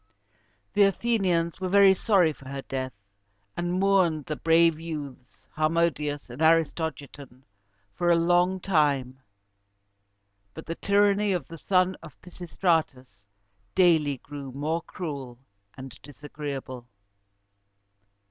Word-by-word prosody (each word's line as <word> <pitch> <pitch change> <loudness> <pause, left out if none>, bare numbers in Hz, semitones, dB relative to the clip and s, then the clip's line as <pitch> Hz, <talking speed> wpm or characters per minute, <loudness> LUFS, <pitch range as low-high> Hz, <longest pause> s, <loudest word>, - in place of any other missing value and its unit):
The 205 - +2
Athenians 195 -5 +1
were 185 - -2
very 200 0 +6
sorry 185 -5 +2
for 135 -2 -13
her 135 0 -6
death, 130 -2 -5 0.6
and 175 +1 -2
mourned 185 -6 +2
the 155 - -4
brave 165 0 +3
youths 145 -6 -8
Harmodius 155 -2 0
and 125 +4 -10
Aristogiton 160 -5 -1 0.5
for 175 +10 -1
a 170 - +5
long 175 +2 +2
time; 145 -8 0 1.4
but 160 - -9
the 165 - -4
tyranny 200 +2 +2
of 175 -7 -3
the 165 - -9
son 185 +1 +1
of 145 - -14
Pisistratus 160 - -2 0.5
daily 160 -6 +3
grew 140 0 -9
more 155 +5 -2
cruel 140 -10 -7 0.4
and 130 -2 -9
disagreeable. 140 -3 -8
160 Hz, 110 wpm, -26 LUFS, 140-180 Hz, 1.4 s, very